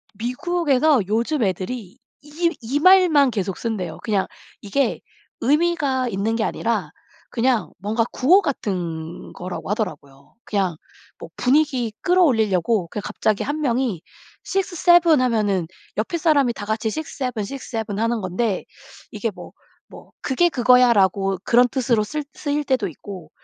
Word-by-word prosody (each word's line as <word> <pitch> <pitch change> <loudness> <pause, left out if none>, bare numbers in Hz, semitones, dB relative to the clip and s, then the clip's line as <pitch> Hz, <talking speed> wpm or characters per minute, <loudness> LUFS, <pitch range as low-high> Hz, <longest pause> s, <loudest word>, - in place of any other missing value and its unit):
미국에서 285 - +1
요즘 235 +5 0
애들이 195 +4 -3 0.3
이 325 +3 -1
이 265 +6 -1
말만 335 -7 +6
계속 195 -3 -3
쓴대요. 195 -8 -4
그냥 205 -4 0 0.3
이게 260 +7 -1 0.4
의미가 285 -3 +1
있는 215 +3 -1
게 225 - 0
아니라 210 -11 -1 0.4
그냥 245 -1 +1
뭔가 220 +3 0
구호 360 +10 +4
같은 170 - -4
거라고 180 +2 -6
하더라고요. 140 -10 -5
그냥 190 -6 -1 0.4
뭐 - - -10
분위기 260 -4 +1
끌어올리려고 225 - +2
그냥 210 - -5
갑자기 215 -2 0
1 295 +3 -3
명이 240 - 0 0.4
6-7 350 -4 +3
하면은 210 -8 +1 0.3
옆에 225 +11 -1
사람이 285 -7 +3
다 205 - -7
같이 220 0 -1
6-7, 255 -4 -4
6-7 225 -4 -5
하는 230 -1 0
건데 190 +2 -2 0.5
이게 - - -3
뭐 - - -11 0.4
뭐 - - -14
"그게 320 +6 +2
그거야."라고 220 - +3
그런 245 +1 +4
뜻으로 240 -4 +1
쓸 300 +5 -4
쓰일 295 0 -2
때도 255 -8 0
있고 180 +2 -10
235 Hz, 265 characters per minute, -22 LUFS, 200-285 Hz, 0.5 s, 말만